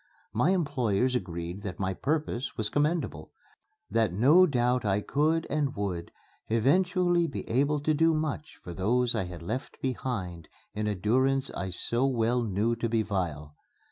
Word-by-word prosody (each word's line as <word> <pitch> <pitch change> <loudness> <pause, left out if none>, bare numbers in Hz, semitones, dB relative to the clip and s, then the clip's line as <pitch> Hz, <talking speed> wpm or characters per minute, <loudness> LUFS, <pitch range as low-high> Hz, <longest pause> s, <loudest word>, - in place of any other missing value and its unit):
My 125 +9 +2
employers 130 - +1
agreed 90 -4 -4
that 100 -3 -6
my 95 -1 -1
purpose 145 - -2
was 105 -1 0
commendable 145 - -1 0.6
that 110 -2 +2
no 145 - +6
doubt 125 -3 +1
I 100 -1 +1
could 155 +7 +1
and 145 -3 -1
would 95 -4 -3 0.4
eventually 175 - +2
be 140 - -6
able 140 +5 +1
to 155 +1 +1
do 165 +1 +3
much 155 -1 -3
for 85 - -7
those 120 +7 +2
I 95 - -1
had 90 -2 -8
left 125 +10 -5
behind 105 -10 -3 0.3
in 105 0 -2
a 105 - 0
durance 130 +7 +1
I 95 - -4
so 120 +8 0
well 120 -1 +1
knew 110 +1 0
to 115 0 -1
be 110 -1 +1
vile. 80 -8 -3
120 Hz, 160 wpm, -28 LUFS, 100-145 Hz, 0.6 s, no